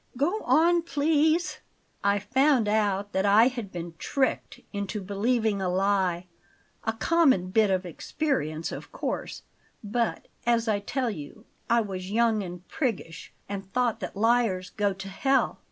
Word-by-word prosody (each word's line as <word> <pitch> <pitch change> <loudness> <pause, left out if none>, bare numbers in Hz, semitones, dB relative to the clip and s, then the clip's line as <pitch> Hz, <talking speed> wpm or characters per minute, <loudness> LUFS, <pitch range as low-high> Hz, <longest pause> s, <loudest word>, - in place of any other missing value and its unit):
Go 350 +11 +1
on, 340 +2 +4
please." 315 +1 +1 0.4
"I 200 0 +3
found 260 +3 +2
out 205 -1 +1
that 190 - 0
I 210 +5 +6
had 235 -6 -6
been 170 -1 -6
tricked 270 -2 -1
into 200 +1 -3
believing 205 +1 0
a 185 - 0
lie; 185 -2 +1 0.6
a 225 - 0
common 260 - +2
bit 215 0 +4
of 185 -1 0
experience, 170 - -2
of - - -8
course; - - -4 0.4
but, 230 +2 -1 0.2
as 235 -1 +2
I 210 -2 +2
tell 245 +4 -2
you, 175 +5 -9 0.2
I 235 0 +4
was 190 -3 -5
young 225 0 +2
and 180 -1 -8
priggish, 225 - -3 0.2
and 195 -1 -6
thought 245 -2 +1
that - - -6
liars 225 -4 +2
go 205 -1 0
to 195 0 -7
hell. 270 +8 +1
210 Hz, 150 wpm, -27 LUFS, 195-250 Hz, 0.6 s, I